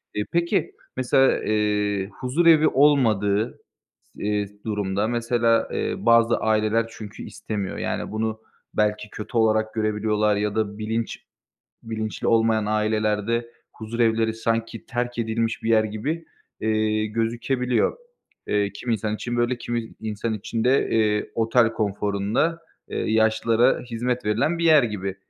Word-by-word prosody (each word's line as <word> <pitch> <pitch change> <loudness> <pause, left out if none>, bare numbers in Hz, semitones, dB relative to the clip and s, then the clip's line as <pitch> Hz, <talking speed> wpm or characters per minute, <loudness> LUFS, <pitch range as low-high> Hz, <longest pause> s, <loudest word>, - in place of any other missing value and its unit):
Eee, 105 0 -1
peki, 170 0 +1 0.3
mesela, 130 +1 +3
eee, 105 -2 0
huzurevi 155 +4 +4
olmadığı 115 -7 +2 0.6
s - - -8
eee, 105 -1 0 0.2
durumda 105 -1 -1
mesela, 115 -1 +1
eee, - - -1
bazı 115 0 +4
aileler 110 +1 +1
çünkü 110 -1 -9
istemiyor. 100 -3 -5
Yani, - - -3
bunu 110 0 -2 0.3
belki 105 0 0
kötü 110 +2 -5
olarak 110 -1 +2
görebiliyorlar 105 -1 +1
ya 105 0 -1
da 105 -1 -1
bilinç 110 +1 -3 0.6
bilinçli 110 -1 -4
olmayan 110 -1 +3
ailelerde 110 +2 0 0.2
huzurevleri 115 0 0
sanki 115 0 -2
terk 120 -1 -3
edilmiş 115 0 -1
bir 115 - -1
yer 110 -1 +5
gibi, 140 +11 -3 0.4
eee, 110 0 +1
gözükebiliyor. 120 - 0 0.5
Eee, 100 -1 +1
kimi 120 +3 -2
insan 110 0 -2
için 120 +2 -4
böyle, 120 +1 +1
kimi 120 -1 -4
insan 110 +1 -3
için 110 +2 -3
de, 130 +2 +3
eee, 105 -2 +1
otel 115 0 +3
konforunda, 105 +9 0 0.3
eee, - - -4 0.2
yaşlılara 110 +2 +3
hizmet 120 0 -3
verilen 120 +11 +1
bir 170 - 0
yer 155 -5 +6
gibi. 100 -4 -3
110 Hz, 130 wpm, -24 LUFS, 105-120 Hz, 0.6 s, yer